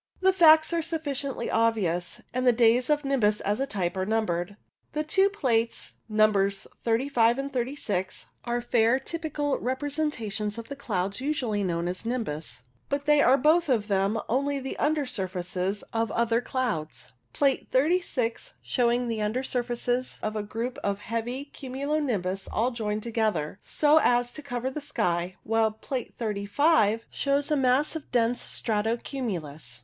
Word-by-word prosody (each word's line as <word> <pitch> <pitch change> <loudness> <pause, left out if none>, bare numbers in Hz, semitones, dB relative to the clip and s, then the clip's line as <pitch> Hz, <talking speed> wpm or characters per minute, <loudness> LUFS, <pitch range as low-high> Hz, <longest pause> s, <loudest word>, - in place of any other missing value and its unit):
The 380 0 +4
facts 320 -3 +6
are 335 - +2
sufficiently 285 -6 -3
obvious, 205 -7 0
and 255 0 0
the - - +8
days 240 +2 +3
of 295 -1 +2
nimbus 215 -7 +2
as 205 +3 0
a 270 - 0
type 185 -8 -2
are 185 - -1
numbered. 205 -3 -1 0.4
The 305 0 0
two 385 +5 +3
plates, 235 - 0 0.2
Nos. 205 -2 +2 0.2
35 235 0 +2
and 275 +1 -4
36, 235 -7 -2 0.2
are 240 0 -1
fair 235 +1 +3
typical 295 -1 -2
representations 255 -6 -2
of 230 0 -7
the 280 - -5
clouds 200 -5 -2
usually 250 -8 -1
known 170 -2 -1
as 180 +1 -4
nimbus; 155 - -3 0.3
but 280 0 -1
they 295 -1 +5
are 270 - +6
both 310 +4 +3
of 220 -5 +2
them 200 +2 +1
only 280 +3 0
the 265 0 -5
under 300 -1 +1
surfaces 185 -3 -3
of 225 0 0
other 230 0 +2
clouds, 220 - -3 0.2
Plate 275 -2 +1
36 295 - 0
showing 245 -1 +1
the 225 -2 -2
under 215 +5 -1
surfaces 245 0 -2
of 215 0 -2
a 215 - -1
group 225 +4 -4
of 200 -1 -1
heavy 230 +6 -4
cumulo 280 +2 -3
nimbus 195 -9 -2
all 240 +4 +1
joined 215 -3 -3
together 215 -7 -1
so 305 +1 +4
as 245 0 +2
to 300 - -7
cover 260 -2 -3
the 300 - -5
sky, 180 -11 -1
while 225 0 +2
Plate 240 +4 -5
35 220 +2 +2
shows 280 +1 0
a - - +4
mass 265 +3 +2
of 320 - -6
dense 240 0 +2
strato 220 +1 -1
cumulus. 160 - -5
235 Hz, 155 wpm, -27 LUFS, 210-275 Hz, 0.4 s, the